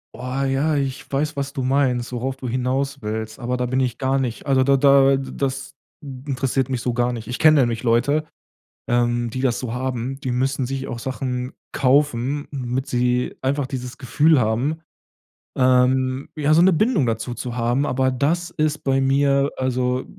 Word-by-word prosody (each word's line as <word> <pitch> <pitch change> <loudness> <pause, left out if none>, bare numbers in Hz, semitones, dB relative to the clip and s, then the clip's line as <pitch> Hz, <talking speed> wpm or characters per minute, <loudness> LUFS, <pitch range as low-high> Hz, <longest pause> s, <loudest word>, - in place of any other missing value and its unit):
Oh, 130 +3 -3
ja. 135 +3 +1
Ich 135 -1 -3
weiß, 145 +2 -1
was 140 0 -3
du 135 - -3
meinst, 130 -2 +1
worauf 130 +2 -3
du 130 - -6
hinauswillst, 125 -3 -2
aber 125 0 -2
da 125 - -1
bin 130 +2 0
ich 125 -2 -1
gar 135 0 0
nicht. 125 -3 -3
Also, 135 -2 +3
da 140 +1 +4
da 135 0 +5
das 135 +1 -4 0.3
interessiert 135 -1 -2
mich 125 -3 -2
so 125 - -1
gar 120 0 +1
nicht. 115 -2 -7
Ich 125 - -4
kenne 155 -2 +6
nämlich 115 -2 -1
Leute, 135 +6 +2 0.6
ähm, 120 0 +1
die 130 - -4
das 125 -2 +1
so 120 -3 -4
haben. 130 +1 -3
Die 130 -4 -3
müssen 130 +1 0
sich 135 +1 -4
auch 120 - -5
Sachen 130 0 -4 0.2
kaufen, 140 0 +1
damit 130 -1 -3
sie 125 0 0
einfach 135 +1 0
dieses 125 -2 -6
Gefühl 150 +3 +3
haben, 125 +8 0 0.8
ähm, 130 +1 +2
ja, 150 0 +1
so 165 - +5
'ne 190 - +5
Bindung 180 - +2
dazu 115 +2 -2
zu 120 0 -5
haben. 120 +4 +1
Aber 130 -1 +1
das 160 +7 0
ist 155 -2 -1
bei 135 -1 +2
mir 140 +1 +2
also, 130 0 -1
130 Hz, 180 wpm, -22 LUFS, 125-140 Hz, 0.8 s, kenne